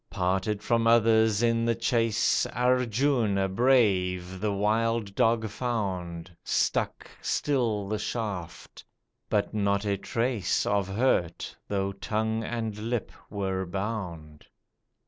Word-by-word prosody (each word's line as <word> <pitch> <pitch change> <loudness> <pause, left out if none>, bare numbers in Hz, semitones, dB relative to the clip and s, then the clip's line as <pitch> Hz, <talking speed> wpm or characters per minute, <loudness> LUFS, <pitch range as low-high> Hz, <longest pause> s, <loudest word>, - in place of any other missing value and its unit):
Parted 95 +2 -1
from 115 -1 +2
others 110 -1 +4
in 115 -1 +2
the 115 0 +1
chase, 115 -1 +1
Arjuna 125 -4 +1
brave 95 -5 +2
the 105 +1 0
wild 110 +1 0
dog 115 +1 +2
found, 95 -7 -3
Stuck - - -1
still 115 -8 0
the 105 +1 -2
shaft, 105 -6 -5 0.5
but 105 0 0
not 100 -1 +1
a 100 -1 0
trace 115 -2 -1
Of 100 -2 +1
hurt, 95 -5 0
though 100 -1 -1
tongue 110 +3 -2
and 115 -2 -3
lip 115 +1 -3 0.2
were 95 -2 -2
bound. 90 -6 -5
105 Hz, 110 wpm, -27 LUFS, 95-115 Hz, 0.5 s, others